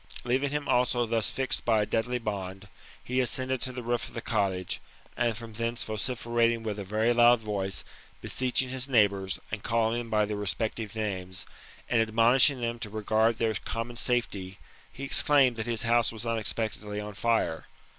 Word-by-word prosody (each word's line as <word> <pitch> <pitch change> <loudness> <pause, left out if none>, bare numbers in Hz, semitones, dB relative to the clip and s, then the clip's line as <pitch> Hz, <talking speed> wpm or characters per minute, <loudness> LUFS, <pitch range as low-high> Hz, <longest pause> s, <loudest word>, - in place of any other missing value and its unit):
Leaving 130 +3 0
him 145 0 -3
also 125 -1 +2
thus 115 -1 +1
fixed 130 -1 -1
by 110 -3 +3
a - - -1
deadly 115 +4 -1
bond, 100 -3 -5 0.4
he 125 +1 -1
ascended 130 +1 0
to 130 - -2
the 125 -1 -6
roof 120 0 -1
of - - -12
the - - -2
cottage, 95 -3 -1 0.3
and 120 -2 0
from 115 -1 -9
thence 115 +2 -2
vociferating 115 +1 0
with 105 -2 -3
a - - -4
very 110 +4 +1
loud 120 0 +6
voice, 100 -3 -3 0.4
beseeching 130 0 0
his 130 +1 -3
neighbours, 100 -6 +2
and 105 -1 -4
calling 115 +1 +1
them 120 -1 -6
by 105 -1 +2
their 105 0 -4
respective 105 +2 -3
names, 95 -4 -4 0.4
and 115 - +2
admonishing 120 +4 +4
them 120 0 -2
to 110 - -5
regard 110 +2 +1
their 115 -2 +1
com 115 +2 -4
mon 120 - -9
safety, 105 -6 -1 0.3
he 135 - -9
exclaimed 135 -2 +6
that 110 0 -4
his 115 -2 -1
house 115 0 +3
was 110 0 -4
unexpectedly 110 -2 -2
on 105 0 -6
fire. 110 -6 0
115 Hz, 180 wpm, -28 LUFS, 105-120 Hz, 0.4 s, loud